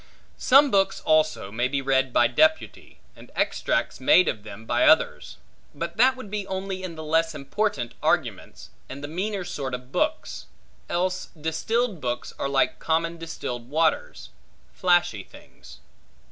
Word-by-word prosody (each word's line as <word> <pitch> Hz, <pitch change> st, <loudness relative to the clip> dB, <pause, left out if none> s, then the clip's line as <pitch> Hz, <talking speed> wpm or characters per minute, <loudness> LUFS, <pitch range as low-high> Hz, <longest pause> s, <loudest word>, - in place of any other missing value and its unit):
Some 275 Hz, +1 st, +5 dB
books 195 Hz, -1 st, +2 dB
also 155 Hz, -10 st, +1 dB
may 120 Hz, +4 st, 0 dB
be 140 Hz, +1 st, -1 dB
read 135 Hz, -1 st, +1 dB
by 120 Hz, -, +4 dB
deputy, 315 Hz, -, +1 dB, 0.2 s
and -, -, -15 dB
extracts -, -, -1 dB
made 235 Hz, -, +5 dB
of 110 Hz, -, -2 dB
them 105 Hz, +1 st, -11 dB
by -, -, +1 dB
others; -, -, +2 dB, 0.4 s
but 170 Hz, 0 st, -5 dB
that 260 Hz, +3 st, +5 dB
would 255 Hz, -6 st, -10 dB
be 205 Hz, -2 st, -3 dB
only 190 Hz, 0 st, -4 dB
in 180 Hz, -3 st, -6 dB
the 160 Hz, -, -7 dB
less 160 Hz, +1 st, +1 dB
important 150 Hz, -, -2 dB
arguments, -, -, -2 dB, 0.2 s
and 140 Hz, +2 st, -8 dB
the -, -, -4 dB
meaner 190 Hz, +5 st, -3 dB
sort 135 Hz, -7 st, -4 dB
of 125 Hz, +1 st, -11 dB
books, -, -, -2 dB, 0.4 s
else 185 Hz, +1 st, -1 dB
distilled 185 Hz, +6 st, -1 dB
books 120 Hz, -1 st, -3 dB
are 140 Hz, -, -1 dB
like 135 Hz, -1 st, +1 dB
common 165 Hz, +1 st, -1 dB
distilled 125 Hz, -7 st, -6 dB
waters, 80 Hz, -, -1 dB, 0.4 s
flashy 175 Hz, -, +2 dB
things. 65 Hz, -, -16 dB
160 Hz, 150 wpm, -25 LUFS, 130-190 Hz, 0.4 s, Some